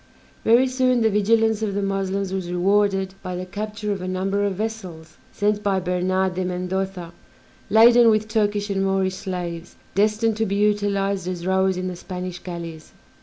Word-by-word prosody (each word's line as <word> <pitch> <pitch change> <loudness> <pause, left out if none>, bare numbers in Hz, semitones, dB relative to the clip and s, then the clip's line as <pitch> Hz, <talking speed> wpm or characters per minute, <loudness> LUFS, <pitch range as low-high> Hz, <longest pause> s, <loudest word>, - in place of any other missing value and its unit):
Very 235 +3 +5
soon 255 -1 +1
the 220 -1 +3
vigilance 220 +1 +2
of 205 -3 -2
the 200 - -1
Moslems 195 0 -2
was 185 -2 -3
rewarded 195 +1 +1
by 185 -1 -5
the 180 +1 -4
capture 210 +2 -4
of 195 -2 -3
a 185 - -4
number 195 +2 -1
of 200 -2 0
vessels, 185 -7 -6
sent 210 0 0
by 200 -2 +1
Bernard 185 +1 0
de 185 +1 -2
Mendoza 180 -1 -3 0.6
laden 235 +2 +7
with 215 0 +2
Turkish 205 -2 0
and 195 0 0
Moorish 190 -1 +1
slaves, 175 -3 -5 0.2
destined 215 +2 +1
to 225 0 0
be 200 - -1
utilized 200 -2 0
as 175 -2 -4
rowers 190 0 +2
in 185 0 -3
the 180 - -4
Spanish 180 0 -6
galleys. 170 -3 -8
195 Hz, 170 wpm, -23 LUFS, 185-210 Hz, 0.6 s, laden